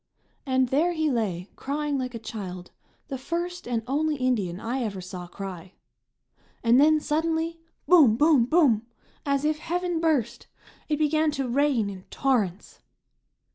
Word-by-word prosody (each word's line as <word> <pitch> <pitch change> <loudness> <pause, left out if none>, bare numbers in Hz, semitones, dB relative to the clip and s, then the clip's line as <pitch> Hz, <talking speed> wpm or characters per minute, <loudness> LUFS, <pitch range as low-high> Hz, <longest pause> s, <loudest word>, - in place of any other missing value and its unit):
And 260 -1 +2
there 320 +7 +2
he 315 -2 0
lay, 195 -7 -2
crying 290 0 -2
like 250 -1 -4
a 225 -1 -8
child, 185 -5 -7 0.4
the 270 - -4
first 345 +4 -4
and 235 -2 -1
only 300 +4 0
Indian 225 -10 -1
I 245 +5 -2
ever 205 -5 -3
saw 180 -1 -7
cry. 185 -1 -8 0.9
And 235 +2 +5
then 310 +1 +5
suddenly 325 +2 -1 0.3
boom! 300 -11 +7
boom! 295 -4 +5
boom! 245 -7 +3 0.4
as 280 +1 +1
if 305 0 +1
heaven 350 +1 -2
burst. 280 -8 0 0.4
It 300 - +1
began 310 +1 +2
to 270 -3 -2
rain 260 -3 +2
in 190 -2 -8
torrents. 215 -9 -1
265 Hz, 145 wpm, -26 LUFS, 220-310 Hz, 0.9 s, boom